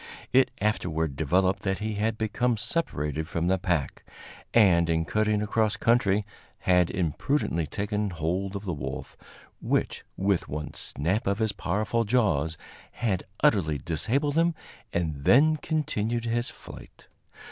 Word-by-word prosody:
It 130 Hz, 0 st, +5 dB
afterward 80 Hz, -8 st, 0 dB
developed 90 Hz, +6 st, +2 dB
that 95 Hz, -1 st, -1 dB
he 110 Hz, 0 st, -3 dB
had 110 Hz, +2 st, -1 dB
become 110 Hz, +2 st, 0 dB
separated 80 Hz, -, -2 dB
from 85 Hz, -1 st, -2 dB
the 95 Hz, +1 st, +2 dB
pack, 85 Hz, -6 st, -1 dB, 0.5 s
and, 85 Hz, -7 st, +5 dB
in 80 Hz, 0 st, +1 dB
cutting 105 Hz, +2 st, +1 dB
across 110 Hz, 0 st, +1 dB
country, 105 Hz, -4 st, +2 dB, 0.4 s
had 90 Hz, -1 st, +3 dB
imprudently 85 Hz, -, 0 dB
taken 105 Hz, +5 st, -2 dB
hold 90 Hz, +4 st, -2 dB
of 100 Hz, +1 st, -5 dB
the 90 Hz, -, -2 dB
wolf, 65 Hz, -3 st, -6 dB, 0.5 s
which, -, -, 0 dB
with 95 Hz, -2 st, +1 dB
one 75 Hz, +1 st, -5 dB
snap 90 Hz, -, -2 dB
of 100 Hz, 0 st, +1 dB
his 110 Hz, -1 st, +1 dB
powerful 105 Hz, +7 st, -1 dB
jaws, 95 Hz, -, +1 dB, 0.4 s
had 100 Hz, -6 st, -1 dB, 0.2 s
utterly 80 Hz, -8 st, +3 dB
disabled 115 Hz, -, 0 dB
him, 170 Hz, 0 st, +2 dB, 0.4 s
and 80 Hz, -5 st, -2 dB
then 155 Hz, -, +5 dB
continued 120 Hz, -8 st, -1 dB
his 120 Hz, +1 st, -1 dB
flight. -, -, -13 dB
100 Hz, 135 wpm, -27 LUFS, 85-110 Hz, 0.5 s, It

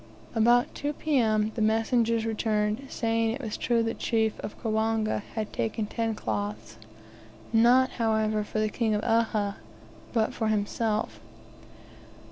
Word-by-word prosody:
About 240 Hz, +2 st, +3 dB
2 290 Hz, +1 st, -3 dB
P.M. 220 Hz, -8 st, +1 dB
the 230 Hz, -, -3 dB
messengers 225 Hz, +1 st, +2 dB
returned, 215 Hz, +2 st, -1 dB
saying 225 Hz, -1 st, 0 dB
it 230 Hz, +5 st, -3 dB
was 220 Hz, -6 st, -4 dB
true 235 Hz, -1 st, +1 dB
the 225 Hz, -, -1 dB
chief 220 Hz, -2 st, 0 dB
of -, -, -7 dB
Kawanga 220 Hz, -1 st, 0 dB
had 215 Hz, -2 st, -3 dB
taken 115 Hz, -, -1 dB
ten 225 Hz, +1 st, -2 dB
cloths; 105 Hz, -, -4 dB, 0.8 s
not, 245 Hz, +3 st, +5 dB
however 220 Hz, -1 st, +1 dB
for 210 Hz, -, -6 dB
the 215 Hz, -, +2 dB
King 220 Hz, 0 st, 0 dB
of 210 Hz, -, -2 dB
Uhha, 220 Hz, -3 st, +1 dB, 0.5 s
but 225 Hz, -2 st, +1 dB
for 220 Hz, -, -1 dB
himself! 215 Hz, +1 st, -1 dB
220 Hz, 135 wpm, -27 LUFS, 215-230 Hz, 0.8 s, not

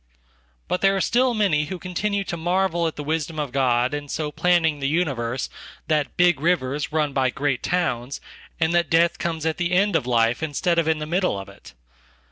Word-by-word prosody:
But 180 Hz, -, -1 dB
there 195 Hz, 0 st, +4 dB
are -, -, 0 dB
still 245 Hz, +4 st, +2 dB
many 175 Hz, -9 st, +2 dB
who 185 Hz, +5 st, -5 dB
continue 200 Hz, +3 st, -2 dB
to 175 Hz, -, -4 dB
marvel 175 Hz, 0 st, 0 dB
at 160 Hz, -, -4 dB
the 150 Hz, -, -5 dB
wisdom 160 Hz, +1 st, -2 dB
ofGod 130 Hz, -3 st, +1 dB
in 145 Hz, -1 st, -4 dB
so 150 Hz, 0 st, -3 dB
planning 165 Hz, -3 st, +2 dB
the 135 Hz, -, -1 dB
universe 135 Hz, -6 st, -1 dB, 0.4 s
that 150 Hz, -2 st, 0 dB
big 175 Hz, -5 st, +4 dB
rivers 150 Hz, -3 st, 0 dB
run 150 Hz, -2 st, 0 dB
by 130 Hz, -1 st, +2 dB
great 135 Hz, 0 st, -1 dB
towns, 135 Hz, -8 st, -1 dB, 0.4 s
and 165 Hz, +1 st, +1 dB
that 175 Hz, -1 st, +2 dB
death 165 Hz, +1 st, +3 dB
comes 160 Hz, -2 st, -3 dB
at 160 Hz, -1 st, 0 dB
the 175 Hz, 0 st, -1 dB
end 200 Hz, +1 st, +3 dB
of 140 Hz, -6 st, +1 dB
life 115 Hz, 0 st, +2 dB
instead 170 Hz, +3 st, 0 dB
of 165 Hz, -, 0 dB
in 160 Hz, -1 st, +2 dB
the 155 Hz, -, -4 dB
middle 180 Hz, -, 0 dB
ofit. 100 Hz, 0 st, -10 dB
160 Hz, 195 wpm, -23 LUFS, 140-175 Hz, 0.4 s, there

